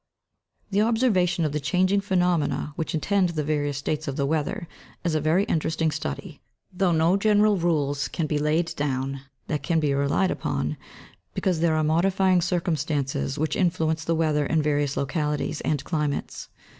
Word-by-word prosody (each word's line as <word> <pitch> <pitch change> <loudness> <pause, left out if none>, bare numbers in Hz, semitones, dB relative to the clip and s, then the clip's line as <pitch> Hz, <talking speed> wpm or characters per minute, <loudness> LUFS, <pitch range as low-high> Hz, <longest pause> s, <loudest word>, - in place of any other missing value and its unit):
The 200 +1 +3
observation 210 -7 +2
of 150 - -1
the 150 - -1
changing 185 +6 +2
phenomena 180 -6 0
which 160 0 -3
attend 190 +3 +1
the 155 -3 -2
various 145 -1 -1
states 150 +2 -3
of 135 - -2
the 140 - 0
weather 155 +3 -2 0.4
is 170 - 0
a 155 - +1
very 160 +6 +3
interesting 160 -3 0
study, 70 - -5 0.3
though 180 0 +1
no 165 +3 +3
general 210 0 +4
rules 145 -5 0
can 165 - -2
be 150 -1 -1
laid 155 +3 0
down 135 -1 -2 0.2
that 150 -3 -2
can 165 +4 +1
be 150 -3 +1
relied 140 +7 +1
upon, - - -2 0.6
because 185 -4 0
there 165 -1 +2
are 155 - +1
modifying 185 +3 +3
circumstances 150 - -1
which 155 0 -1
influence 160 -3 0
the 165 +1 0
weather 155 -3 +1
in 160 -2 +1
various 145 -2 0
localities 150 +2 -1
and 145 -3 -1
climates. 150 -4 -3
160 Hz, 165 wpm, -25 LUFS, 145-180 Hz, 0.6 s, general